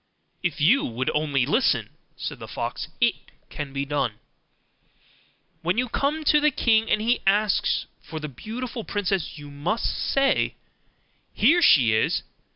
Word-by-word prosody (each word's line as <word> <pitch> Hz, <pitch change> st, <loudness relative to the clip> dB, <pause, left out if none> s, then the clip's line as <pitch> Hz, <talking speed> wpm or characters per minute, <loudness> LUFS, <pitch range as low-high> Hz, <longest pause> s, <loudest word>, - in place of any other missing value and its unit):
'If 175 Hz, -3 st, -2 dB
you 195 Hz, -, +4 dB
will 125 Hz, +3 st, -2 dB
only 145 Hz, -4 st, +1 dB
listen,' 225 Hz, -, +1 dB, 0.3 s
said -, -, -5 dB
the -, -, -8 dB
fox, -, -, -4 dB
'it 235 Hz, -3 st, +4 dB, 0.4 s
can 145 Hz, -2 st, -5 dB
be 140 Hz, +1 st, -2 dB
done. 140 Hz, -6 st, -1 dB, 1.5 s
When 175 Hz, +5 st, 0 dB
you 250 Hz, 0 st, 0 dB
come 295 Hz, +6 st, -1 dB
to 300 Hz, 0 st, +4 dB
the 300 Hz, +1 st, +4 dB
king, 225 Hz, -5 st, +2 dB
and -, -, +3 dB
he 235 Hz, +3 st, +1 dB
asks 205 Hz, +1 st, +2 dB, 0.2 s
for 160 Hz, -, -7 dB
the 150 Hz, -, -5 dB
beautiful 230 Hz, -, -6 dB
princess, 195 Hz, -7 st, -2 dB
you 145 Hz, -1 st, -10 dB
must 170 Hz, +11 st, -2 dB
say, 275 Hz, 0 st, +1 dB, 0.8 s
"Here 325 Hz, +10 st, +4 dB
she 125 Hz, -, +6 dB
is!" 110 Hz, -, +1 dB
195 Hz, 150 wpm, -24 LUFS, 145-240 Hz, 1.5 s, she